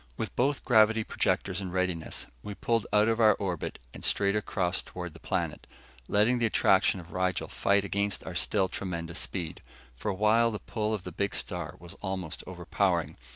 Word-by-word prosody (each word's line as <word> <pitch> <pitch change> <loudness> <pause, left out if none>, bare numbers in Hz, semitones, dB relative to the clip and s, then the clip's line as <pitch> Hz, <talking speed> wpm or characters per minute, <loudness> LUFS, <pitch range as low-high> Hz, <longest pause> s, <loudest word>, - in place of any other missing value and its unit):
With - - -4
both 135 +3 +1
gravity 110 -2 +5
projectors 95 -2 0
in 95 - -4
readiness, 90 -3 -2 0.2
we 105 - -6
pulled 115 0 0
out 105 +1 +5
of 115 0 +1
our 110 -3 +6
orbit 90 -5 -3 0.2
and - - -10
straight 100 0 +2
across 90 -4 0
toward 90 -3 -7
the 80 - -13
planet, 85 -4 -2 0.4
letting 110 +5 +3
the 115 - +3
attraction 100 - +3
of 85 -1 -12
Rigel 95 -1 0
fight 100 0 +2
against 100 0 -1
our - - -5
still 100 -3 +2
tremendous 85 -3 -4
speed. 85 -4 -4 0.3
For 85 - -3
a 100 - -1
while, 110 +4 +4
the 110 - -3
pull 110 +2 -2
of 100 - -6
the 90 - -6
big 100 +3 -1
star - - -4
was 85 +1 -11
almost 95 -5 -4
overpowering. - - 0
100 Hz, 185 wpm, -29 LUFS, 90-110 Hz, 0.4 s, our